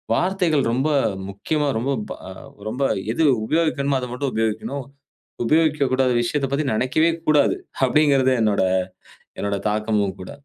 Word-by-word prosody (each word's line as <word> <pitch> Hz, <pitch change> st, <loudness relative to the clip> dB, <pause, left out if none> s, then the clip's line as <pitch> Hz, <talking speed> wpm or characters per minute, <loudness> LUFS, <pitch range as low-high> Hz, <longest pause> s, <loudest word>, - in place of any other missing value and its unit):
வார்த்தைகள் 180 Hz, -5 st, +1 dB
ரொம்ப 135 Hz, +5 st, +1 dB, 0.4 s
முக்கியமா 145 Hz, +10 st, -2 dB
ரொம்ப 125 Hz, +5 st, -1 dB, 0.2 s
ப -, -, -3 dB, 0.6 s
ரொம்ப 120 Hz, +4 st, -6 dB, 0.3 s
எது 160 Hz, +8 st, 0 dB, 0.2 s
உபயோகிக்கணும். 145 Hz, -1 st, +1 dB
அதை 125 Hz, -, -4 dB
மட்டும் 130 Hz, +2 st, -2 dB
உபயோகிக்கணும். 110 Hz, +5 st, -2 dB, 0.6 s
உபயோகிக்கக்கூடாத 140 Hz, -3 st, +2 dB
விஷயத்தைப் 135 Hz, +3 st, -1 dB
பத்தி 145 Hz, +2 st, 0 dB
நினைக்கவே 130 Hz, +8 st, +2 dB, 0.2 s
கூடாது. 155 Hz, -, +4 dB, 0.3 s
அப்படிங்கிறது 135 Hz, -1 st, +3 dB
என்னோட 105 Hz, -3 st, +2 dB, 0.8 s
என்னோட 100 Hz, 0 st, -1 dB
தாக்கமும் 105 Hz, -2 st, 0 dB
கூட. 90 Hz, -, -8 dB
135 Hz, 120 wpm, -22 LUFS, 110-150 Hz, 0.8 s, கூடாது